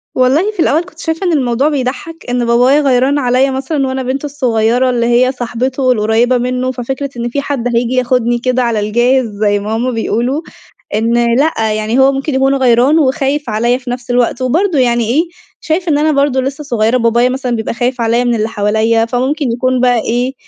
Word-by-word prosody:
والله 275 +11 +2
في 420 - -18
الأول 325 0 +2
كنت 330 -2 -18
شايفة 325 +3 -3
إن 345 - +1
الموضوع 260 0 +1
بيضحّك، 290 +4 -4
إن 245 -1 0
بابايا 250 +5 +3
غيران 270 +1 +2
عليّا 255 +1 +2
مثلًا 270 +1 -2
وأنا 260 0 -3
بنته 265 +3 -3
الصغيّرة 250 -3 +1
اللي 240 -2 0
هي 245 +2 +3
صاحبته 255 +1 -1
القريّبة 230 +2 +2
منه، 250 +1 -2
ففكرة 265 +2 -4
إن 240 0 -3
في 280 +4 -2
حد 245 -4 -2
هييجي 235 +1 0
ياخدني 245 -1 +1
كده 255 +1 0
على 230 -3 0
الجاهز 240 +5 +1 0.2
زي 205 -1 +2
ما 210 +2 -3
هُم 245 +3 -1
بيقولوا، 240 +5 -1 0.5
إن 235 +2 +1
لأ 225 -8 0
يعني 215 +4 -1
هو 265 +1 +5
ممكن 275 +1 -3
يكون 270 +1 +2
غيران 260 +3 +3
وخايف 275 0 0
عليّا 235 +3 +1
في 255 -1 -9
نفْس 245 0 -5
الوقت، 245 0 0
وبرضه 315 +5 +1
يعني 240 -2 +2
إيه، 290 +7 +2 0.4
شايف 345 +3 -2
إن 290 - +2
أنا 310 +1 +2
برضه 280 -2 +1
لسّه 275 +3 -4
صغيرة 235 -3 +1
بابايا 235 +1 +2
مثلًا 255 -2 -2
بيبقى 220 -1 -3
خايف 245 +1 -2
عليّا 230 +1 +1
من 240 -1 +1
اللي 220 0 -1
حواليّا، 220 +2 +1
فممكن 255 +3 -1
يكون 255 +1 0
بقى 245 -2 +3
إيه، 245 +4 -1
250 Hz, 195 wpm, -14 LUFS, 235-275 Hz, 0.5 s, هو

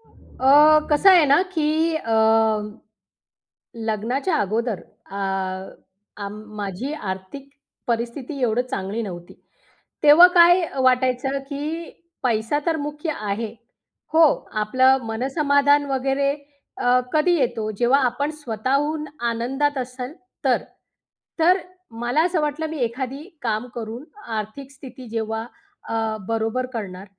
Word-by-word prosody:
अ, 265 -10 -5 0.4
कसं 375 +7 +6
आहे 350 -4 +7
ना 285 +5 +5
की 305 -2 +1 0.3
अ, 230 -7 -3 1.8
लग्नाच्या 245 - -1
अगोदर 220 +1 -2 0.3
अ, 200 - -7 1.0
अ, 200 -1 -5
माझी 215 +4 -6
आर्थिक 205 +3 -6 0.4
परिस्थिती 240 +4 -3
एवढं 240 +1 +2
चांगली 195 +4 -3
नव्हती. 175 -4 -8 0.7
तेव्हा 310 +5 +9
काय 350 +2 +7
अ, 275 - -7
वाटायचं 255 +1 +2
की 285 0 -4 0.6
पैसा 230 +4 +1
तर 325 -1 +1
मुख्य 295 +2 -4
आहे. 210 +1 -3 0.6
हो, 325 +1 +6 0.4
आपलं 260 +4 +3
मनसमाधान 285 +4 +2
वगैरे 270 +1 +1 0.5
अ, 250 0 +3
कधी 310 +3 +3
येतो 235 -5 -1
जेव्हा 245 +3 +4
आपण 280 +4 -1
स्वतःहून 280 +6 -1 0.3
आनंदात 270 +5 -1
असाल 255 +2 -5 0.3
तर. - - +2 0.8
तर 350 +3 +5 0.4
मला 245 +6 +2
असं 355 -1 0
वाटलं 300 +2 -2
मी 315 - -5
एखादी 260 +4 -4 0.2
काम 225 0 -2
करून 230 +2 -6 0.3
आर्थिक 215 +6 -6
स्थिती 260 -2 -12
जेव्हा 225 0 -3 0.4
अ, - - -3 0.3
बरोबर 225 +3 -1
करणार, 195 -4 -6
255 Hz, 115 wpm, -22 LUFS, 225-290 Hz, 1.8 s, तेव्हा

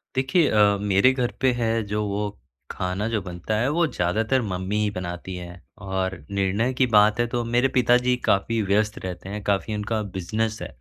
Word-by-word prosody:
देखिए 135 +5 +2
अ, 105 -1 +4
मेरे 100 +5 +4
घर 125 -2 -1
पे 130 -1 +4
है 115 -1 +1
जो 105 0 0
वो 105 +1 -2 0.4
खाना 95 +3 -2
जो 110 -3 -1
बनता 90 +4 -4
है 125 - +1
वो 170 +3 +2
ज़्यादातर 110 +6 0
मम्मी 95 -1 -3
ही 105 - +1
बनाती 90 0 -6
हैं 90 0 -9 0.3
और 95 0 -2
निर्णय 100 +6 0
की 130 +1 +2
बात 105 0 +4
है 120 - +3
तो 120 0 -2
मेरे 120 +3 +2
पिताजी 125 +1 +4
काफ़ी 110 +3 +1
व्यस्त 105 +1 +1
रहते 90 +1 -6
हैं। 105 +1 -5
काफ़ी 100 +2 0
उनका 110 +1 -2 0.2
बिज़नेस 110 +5 -2
है - - -4
105 Hz, 190 wpm, -24 LUFS, 95-120 Hz, 0.4 s, अ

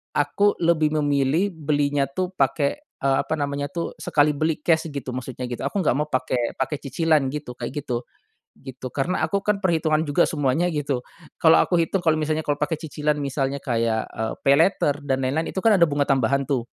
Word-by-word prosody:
aku 205 0 +2
lebih 165 -3 +2
memilih 145 +6 +1
belinya 145 -2 +1
tuh 185 +5 -1
pake, 140 - 0 0.2
eee, 135 0 +2
apa - - -3
namanya 140 0 -2
tuh 170 -2 -4
sekali 150 0 +2
beli 155 +1 0
cash 160 0 +1
gitu 130 -3 -5
maksudnya 125 -1 -5
gitu 120 +1 -5
aku 140 +9 -1
nggak 150 -8 +2
mau 150 +2 -1
pake 130 -1 -1
pake 135 +3 -1
cicilan 155 +1 +2
gitu 145 -5 -6
kayak - - -5
gitu, 125 -4 -3 0.6
gitu. 130 0 -7
Karena 160 +7 0
aku 200 -1 -1
kan 210 -1 +1
perhitungan 160 -4 +1
juga 145 +4 +3
semuanya 150 +4 0
gitu, 140 -5 -2 0.4
kalau 160 -2 +6
aku 180 - +2
hitung 185 +3 0
kalo 160 -2 +2
misalnya 155 0 -1
kalo 145 - +2
pake 155 +1 -1
cicilan 150 -2 -2
misalnya 140 0 -2
kayak, 115 -4 -1
eee, 110 0 -3
paylater 145 +1 +4
dan 135 -2 0
lain-lain 150 +6 -1
itu 190 - -3
kan 220 +1 +4
ada 175 - +5
bunga 145 -1 0
tambahan 135 0 +1
tuh. 130 -4 0
145 Hz, 190 wpm, -23 LUFS, 135-160 Hz, 0.6 s, kalau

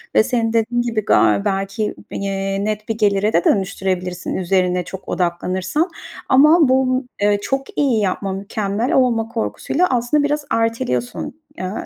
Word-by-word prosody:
ve - - +6
senin 230 -2 0
dediğin 235 +2 +1
gibi 225 -3 -2
ga 105 - +4
belki, 195 +2 -1 0.2
eee, 195 0 -2
net 215 0 -3
bir 225 - -1
gelire 205 0 +2
de 170 - +3
dönüştürebilirsin 185 -2 -1
üzerine 180 -1 +1
çok 190 +2 -9
odaklanırsan. 185 - -1 0.4
Ama 300 +4 +6
bu, 260 0 +2 0.2
ııı, 205 0 +3
çok 270 +4 -3
iyi 265 -7 +2
yapma, 195 0 -1
mükemmel 205 +3 -2
olma 235 -4 +2
korkusuyla 280 +9 -1
aslında 250 +4 +1
biraz 290 0 -1
erteliyorsun, 225 - -2 0.2
eee, 185 0 -4
215 Hz, 140 wpm, -19 LUFS, 190-245 Hz, 0.4 s, ve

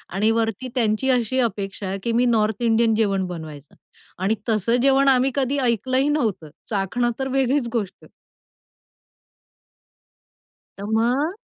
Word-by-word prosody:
आणि 215 +3 +2
वरती 225 +2 -1
त्यांची 230 +2 +1
अशी 250 0 +1
अपेक्षा 200 -4 -2
आहे, 195 +1 -3
की 235 - -1
मी 240 +2 +2
नॉर्थ 220 -2 +1
इंडियन 225 -1 +3
जेवण 195 -4 +1
बनवायचं. 155 -5 -9 0.4
आणि 200 +4 +1
तसं 220 +2 +1
जेवण 275 0 +4
आम्ही 265 0 +4
कधी 275 +1 0
ऐकलंही 255 +3 +1
नव्हतं, 215 - -1 0.2
चाखणं 225 +4 0
तर 265 - -1
वेगळीच 265 -1 +1
गोष्ट. 210 -5 -4 2.7
तर 200 - -7
मग 270 - +1
230 Hz, 130 wpm, -22 LUFS, 205-260 Hz, 2.7 s, जेवण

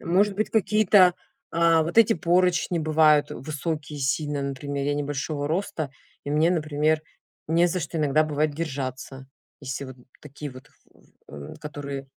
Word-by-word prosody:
может 195 +4 +2
быть, 215 +2 -1
какие-то, 205 -3 +4 0.4
а, 165 -1 +4
вот 170 +8 0
эти 225 - +6
поручни 175 +1 +1
бывают 155 -2 +3
высокие 150 0 -5
сильно, 145 +2 -1
например, 140 +1 -4
я 145 - +1
небольшого 145 0 -3
роста 160 -4 -2 0.3
и 145 - -4
мне, 155 +3 +3
например, 155 -2 +1 0.4
не 170 +2 +3
за 180 +1 -1
что 165 0 -4
иногда 150 +1 +3
бывает 150 0 -1
держаться, 135 -3 -5 0.3
если 140 0 -5
вот 130 -1 -10 0.3
такие 150 0 -8
вот, 130 0 -13 0.6
в 70 -1 -9
в - - -19
которые 140 -2 -6
150 Hz, 150 wpm, -25 LUFS, 140-170 Hz, 0.6 s, эти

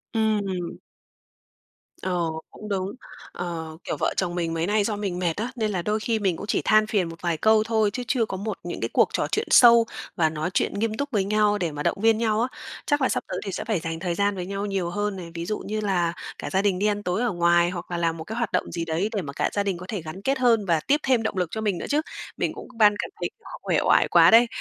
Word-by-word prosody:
Ừm. 205 -5 0 1.2
Ờ, 180 -1 -1 0.3
cũng 210 0 -10
đúng, 190 -1 -1 0.4
ờ, 160 -2 -5
kiểu, - - -3
vợ - - 0
chồng 175 -2 -1
mình 165 -2 -1
mấy 165 +2 -1
nay 210 0 +2
do 210 0 -1
mình 195 -3 -3
mệt 170 -3 0
á, 230 +4 -2
nên 215 -3 -1
là 180 -3 -1
đôi 210 +4 0
khi 225 0 0
mình 190 -4 +1
cũng 205 - -7
chỉ - - +1
than 215 0 +5
phiền 190 -6 0
một 165 - -11
vài 170 -3 0
câu 220 +2 +4
thôi, 220 -1 +2
chứ 250 - -3
chưa 245 -5 +2
có 190 -3 -5
một 215 +3 -4
những - - -5
cái - - -1
cuộc - - +4
trò - - 0
chuyện 435 - 0
sâu 235 -1 +8 0.3
và 160 -3 +3
nói 155 +2 -3
chuyện - - +1
nghiêm 215 +1 -1
túc 285 0 -2
với 205 -4 +1
nhau 210 0 +2
để 170 -5 -1
mà 145 0 -5
động - - +1
viên 225 0 +4
nhau 220 -1 +1
á, 245 - +2 0.4
chắc 290 0 +1
là 260 - +3
sắp - - -1
tới - - -3
thì 195 - -3
sẽ - - -4
phải 215 -7 0
dành 165 -1 -4
thời 175 -1 -2
gian 200 +2 +1
với 180 -1 -4
nhau 200 +1 -3
nhiều 195 -4 -1
hơn 205 +2 -2
này. 170 -2 -8
Ví 170 0 -4
dụ 215 - -2
như 215 +1 -4
là 175 -4 +1 0.2
cả - - -5
gia 190 0 +1
đình 195 -3 +1
đi 205 - +1
ăn 205 0 -1
tối 180 +5 -1
ở 245 -3 +1
ngoài 175 0 +3
hoặc 180 -1 -7
là 175 - -1
làm 165 -1 0
một 160 - -6
cái 220 +5 -6
hoạt 235 -3 -1
động - - -1
gì 165 0 -3
đấy 165 +6 -1
để 200 - 0
mà 140 -3 -7
cả - - 0
gia 205 - +1
đình 195 -3 -1
có 180 - -9
thể 205 -5 -3
gắn 160 +5 -8
kết 270 +4 0
hơn 230 -5 +3
và 165 -4 +2
tiếp 290 +2 +4
thêm 255 -4 +2
động 210 - -2
lực 180 -2 +1
cho 220 - -3
mình 205 -4 0
nữa - - -5
chứ, 295 +1 +2 0.4
mình - - -1
cũng - - -9
ban 210 -2 +6
cảm - - -3
thấy - - -1
quá - - -13
uể - - +1
oải - - +4
quá - - +6
đấy. 235 +1 +7
200 Hz, 285 wpm, -25 LUFS, 175-220 Hz, 1.2 s, sâu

